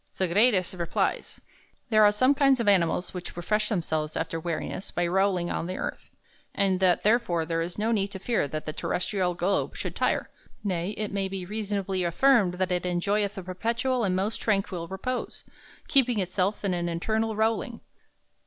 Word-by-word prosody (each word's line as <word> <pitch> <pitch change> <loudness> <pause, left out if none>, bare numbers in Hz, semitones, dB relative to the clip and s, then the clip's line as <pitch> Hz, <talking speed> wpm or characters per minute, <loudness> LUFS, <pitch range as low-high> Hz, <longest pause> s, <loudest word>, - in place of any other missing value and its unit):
Sagredus 190 +1 +2
replies: 170 -2 -2 0.5
"There 215 -1 +6
are 205 - +7
some 255 +7 +3
kinds 275 -2 +4
of 230 - -1
animals 180 -3 +2
which 180 -1 -7
refresh 210 +4 0
themselves 160 -6 -1
after 165 0 -2
wearinesse 170 +3 -3
by 175 - -1
rowling 185 -1 +1
on 170 - -2
the 185 - -4
earth; - - -5 0.5
and 190 -2 +2
that 185 -2 +3
therefore 210 -7 +2
there 165 0 -1
is 175 +1 -4
no 220 +2 0
need 200 -3 +1
to 200 - -7
fear 200 -4 0
that 155 +2 -5
the 155 - -4
Terrestrial 180 +1 -1
Globe 180 +3 0
should - - -4
tire, - - 0 0.3
nay, 185 0 -2
it 215 -1 -3
may 195 -1 -1
be 190 -1 -5
reasonably 200 -2 -2
affirmed 195 +1 +3
that 185 0 -1
it 180 0 0
enjoyeth 200 +3 0
a 190 - -5
perpetual 230 +7 -1
and 185 -3 +1
most 200 +4 -1
tranquil 195 -5 -1
repose, 220 +7 -4 0.4
keeping 255 -4 +3
itself 190 +2 -1
in 190 - +1
an 175 -1 -1
eternal 220 +6 -1
rowling." 225 +3 0
195 Hz, 175 wpm, -27 LUFS, 175-215 Hz, 0.5 s, are